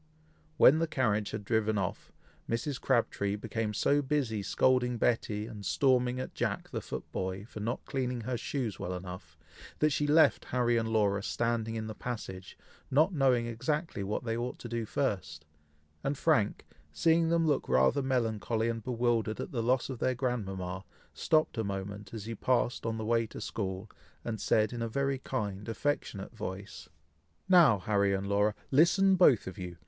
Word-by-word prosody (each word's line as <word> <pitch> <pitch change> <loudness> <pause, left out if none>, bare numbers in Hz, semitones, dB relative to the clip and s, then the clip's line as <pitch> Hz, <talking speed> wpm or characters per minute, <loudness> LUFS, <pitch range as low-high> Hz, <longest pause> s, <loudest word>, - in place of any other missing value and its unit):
When 150 +4 +7
the 165 - +1
carriage 110 -8 0
had 110 -1 -5
driven 110 -1 +1
off, 95 -3 -3 0.4
Mrs. 125 +4 -2
Crabtree 110 -5 +1
became 110 +1 -3
so 145 +7 +2
busy 130 -7 -1
scolding 125 +3 +2
Betty, 110 -3 0
and 110 -3 -9
storming 125 +1 +2
at 130 - -5
Jack - - -2
the - - -3
foot - - -5
boy, 95 +2 -3
for 110 - -9
not 115 +3 -3
cleaning 125 -2 -2
her 125 +3 -2
shoes 120 -2 -3
well 90 +1 -3
enough, 90 -4 -9 0.4
that 155 0 +3
she 145 +1 0
left 155 +2 +4
Harry 120 -1 +1
and 115 -1 0
Laura 105 -3 +2
standing 115 +1 -1
in 110 -1 -3
the 110 - -5
passage, 100 -6 -6 0.3
not 155 +8 +3
knowing 130 -5 +3
exactly 135 - -2
what 105 +5 -2
they 115 -1 -2
ought 120 +2 -3
to - - -8
do 115 -1 -3
first, 85 - -2 0.6
and 140 +1 -1
Frank, 120 -11 +1 0.3
seeing 165 - +3
them 165 0 +2
looking 140 - +1
rather 65 - +4
melancholy 115 -3 0
and 115 -1 -3
bewildered 115 -3 0
at - - -5
the 120 - -1
loss 125 +2 +1
of 130 -3 -6
their 130 0 +1
grandmama, 95 -7 -3 0.3
stopped 155 -6 +1
a - - +1
moment 100 +1 -5
as 110 -3 -6
he 115 - -4
passed 120 +1 0
on 115 0 -2
the 110 - -4
way 115 0 +2
to - - -9
school, 95 -1 -4 0.4
and 110 -3 -3
said 110 +2 +2
in 120 - -4
a 115 - -2
very 135 +2 -1
kind, 105 -5 -4
affectionate 115 -4 -3
voice, 100 -1 -7 0.6
"Now, 170 - +6
Harry 100 0 +1
and 95 +1 -3
Laura, 105 +1 +2 0.2
listen 180 +7 +5
both 150 - +5
of 95 - -7
you! 90 -1 -6
115 Hz, 175 wpm, -30 LUFS, 105-130 Hz, 0.6 s, When